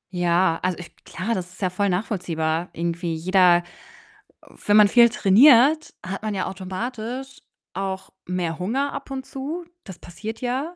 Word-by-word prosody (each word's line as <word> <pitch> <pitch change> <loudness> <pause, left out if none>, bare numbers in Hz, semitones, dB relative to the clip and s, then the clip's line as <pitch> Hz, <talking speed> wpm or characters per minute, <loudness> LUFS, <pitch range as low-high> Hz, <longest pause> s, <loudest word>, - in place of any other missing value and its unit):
Ja, 175 -1 +2
also, 185 -1 -1
ich 175 - -11
klar, 215 +6 -3
das 180 -3 -5
ist 185 - -17
ja 185 -2 0
voll 200 +2 0
nachvollziehbar 175 -4 -2
irgendwie. 170 0 -3
Jeder 180 0 +4 1.0
wenn 205 - +4
man 210 -1 +8
viel 235 +1 +7
trainiert, 255 +8 +5
hat 195 +1 -5
man 215 -2 -2
ja 190 - -1
automatisch 235 +7 -6 0.3
auch 190 0 -4 0.2
mehr 175 -3 -3
Hunger 265 +10 -1
ab 275 - -7
und 265 -1 -5
zu. 300 +7 -6 0.2
Das 190 -4 -10
passiert 215 +6 -8
ja 265 +7 -3
190 Hz, 155 wpm, -23 LUFS, 180-245 Hz, 1.0 s, man